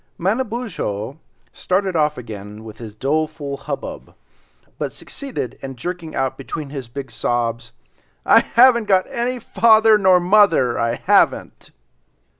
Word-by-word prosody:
Manabozho 195 - -3 0.3
started 190 0 -1
off 150 -1 +1
again 105 -2 -9
with 110 -1 -11
his 110 -3 -9
doleful 150 +2 -2
hubbub, 135 - -7 0.6
but - - -2
succeeded 245 - -7
in 135 -1 -7
jerking 165 +5 -6
out 130 0 -2
between 140 +1 -6
his 135 -4 -6
big 135 +1 -8
sobs, 115 0 -2 0.5
"I - - +7
haven't 235 -1 +4
got 190 -2 +3
any 245 +2 -2
father 220 -2 +4
nor 190 -2 +5
mother, 175 - +3
I 115 0 0
haven't." - - +1
155 Hz, 125 wpm, -20 LUFS, -, 0.6 s, I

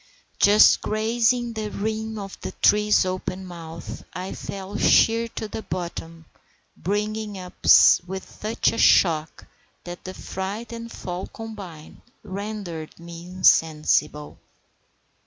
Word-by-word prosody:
Just 205 +1 +6
grazing 235 +2 +1
the 215 -1 -4
rim 220 +2 -3
of 195 -1 -7
the - - -6
tree's 210 -1 +3
open 185 0 -4
mouth, 165 -2 -9
I 185 +2 -5
fell 195 +1 -7
sheer 230 +2 +4
to 220 - -4
the 215 - -6
bottom, 165 -3 -6 0.5
bringing 210 +2 -3
up 180 -1 -9 0.5
with 190 +1 -6
such 220 +2 -1
a 230 - -4
shock 160 -3 +3 0.4
that 175 0 -9
the 185 - -7
fright 200 +5 -5
and 230 0 -7
fall 180 +1 -6
combined 205 - -10 0.2
rendered 195 -6 -6
me 170 0 -10
insensible. 155 -4 +2
195 Hz, 120 wpm, -24 LUFS, 175-215 Hz, 0.5 s, Just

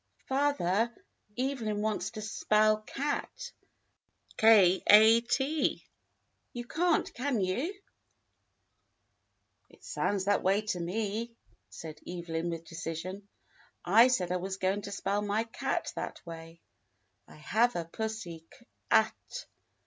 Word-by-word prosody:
"Father, 240 -6 +1 0.5
Evelyn 235 -6 -1
wants 215 -2 -1
to 215 - -7
spell 215 0 +2
cat, 290 - -4 0.9
h 195 -5 +6
a 220 +2 +8
t; 270 +6 -1 0.7
you 240 -1 -5
can't, 335 +5 +1
can 255 -2 -1
you.^" 200 - -1 2.0
"It - - -21
sounds 195 -2 -1
that 205 0 +2
way 195 +3 +2
to 210 -4 -3
me," 215 +6 -3 0.3
said 155 -1 -9
Evelyn 170 -1 -3
with 165 -1 -5
decision. 165 +5 -6 0.6
"I 220 +7 +7
said 185 -9 0
I 180 - +1
was 190 +1 -4
going 195 +2 0
to 200 0 -7
spell 200 +1 -1
my 210 +2 0
cat 230 0 -3
that - - -6
way 165 0 -10 0.3
— 100 +2 -46
I - - -15
have 225 +10 +1
a 170 - -2
pussy 175 -4 -5
k 240 - -20 0.2
a 220 0 +5 0.2
t. - - -5
210 Hz, 125 wpm, -30 LUFS, 180-230 Hz, 2.0 s, a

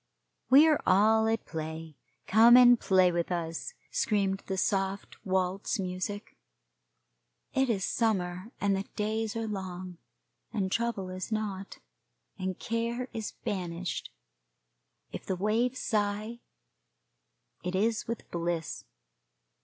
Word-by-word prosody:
We 285 +5 +8
are 305 -2 +3
all 220 +4 +5
at 225 0 0
play, 160 -1 -6 0.3
come 230 +4 +7
and 245 -1 +8
play 185 -2 +4
with 170 +1 -1
us, 170 - -3 0.2
screamed 205 - +1
the 190 - -2
soft 195 +1 -1
waltz 190 +3 0
music. 195 +2 -4 1.2
It 265 -1 +2
is 195 -5 +1
summer, 190 -2 -1
and 200 -1 +2
the 195 +1 -2
days 220 +1 -1
are 225 0 -2
long, 185 -4 -6 0.5
and 195 -4 -1
trouble 230 -5 -1
is 185 +4 -6
not, 200 -3 -3 0.6
and 185 -1 -3
care 235 +2 -2
is 220 -2 -4
banished. 180 -2 -3 1.0
If - - -8
the 190 - 0
waves 225 +7 +1
sigh, 215 +1 -1 1.2
it 180 +1 -2
is 220 +3 +1
with 230 -1 -5
bliss. 170 -2 -3
200 Hz, 120 wpm, -29 LUFS, 185-225 Hz, 1.2 s, We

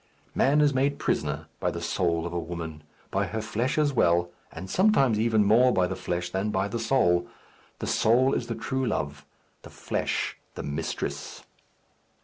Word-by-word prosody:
Man 145 +3 +3
is 145 -1 +4
made 140 +2 +1
prisoner - - -1
by - - 0
the - - -4
soul 85 -2 0
of 85 - -5
a 85 - -1
woman; 80 -2 -6 0.3
by - - 0
her 110 - -3
flesh 110 +6 -1
as 150 -2 +2
well, 85 -6 +2 0.2
and 95 +4 -8
sometimes 135 - +3
even 110 -1 +3
more 120 +5 +5
by 95 -5 +2
the - - -3
flesh 90 0 -3
than 95 +3 -1
by 95 -1 0
the 115 +3 -3
soul. 110 -8 +2 0.5
The - - -5
soul 130 +5 +3
is 120 - -1
the 115 - -3
true 130 +1 -2
love, 75 -8 -3 0.3
the - - -12
flesh, - - -2 0.2
the - - -5
mistress. 75 +3 -4
105 Hz, 175 wpm, -27 LUFS, 85-130 Hz, 0.5 s, more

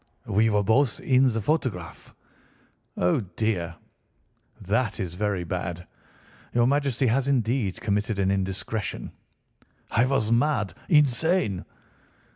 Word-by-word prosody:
"We 110 +3 +2
were 105 -1 +2
both 115 +4 +2
in 130 -1 +3
the 115 0 -2
photograph." 105 - -2 0.9
"Oh, 90 +6 +2
dear! 95 -4 -2 0.8
That 105 +3 -1
is 90 -3 -3
very 100 -1 -1
bad! 90 0 -4 0.7
Your 120 -1 +4
Majesty 140 -1 +1
has 130 +3 +1
indeed 120 -6 0
committed 105 -1 -1
an 95 -1 +1
indiscretion." 100 +2 -3 0.8
"I 120 +3 +3
was 130 -5 +1
mad—insane." 130 - +1
110 Hz, 105 wpm, -26 LUFS, 95-130 Hz, 0.9 s, Your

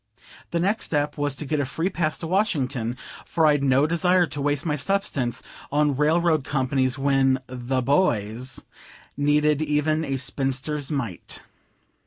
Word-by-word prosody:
The 170 - -1
next 200 +6 +1
step 145 -1 0
was 145 -2 -1
to 150 - -4
get 150 +1 -1
a - - +1
free 165 +8 -2
pass 155 -2 -1
to - - -6
Washington, 140 - 0 0.3
for 160 - +1
I'd 145 -2 +3
no 135 +1 +4
desire 180 +3 +3
to 150 -3 -5
waste 145 +1 0
my 150 -3 0
substance 145 -6 -1 0.3
on 145 -1 +2
railroad 155 +1 +2
companies 130 0 0
when 135 -1 +3
"the 130 0 -2
boys" 125 - 0 0.5
needed 150 +1 +2
even 155 +1 +1
a 135 -3 -2
spinster's 135 +2 -2
mite. 120 - -3
145 Hz, 150 wpm, -24 LUFS, 135-155 Hz, 0.5 s, no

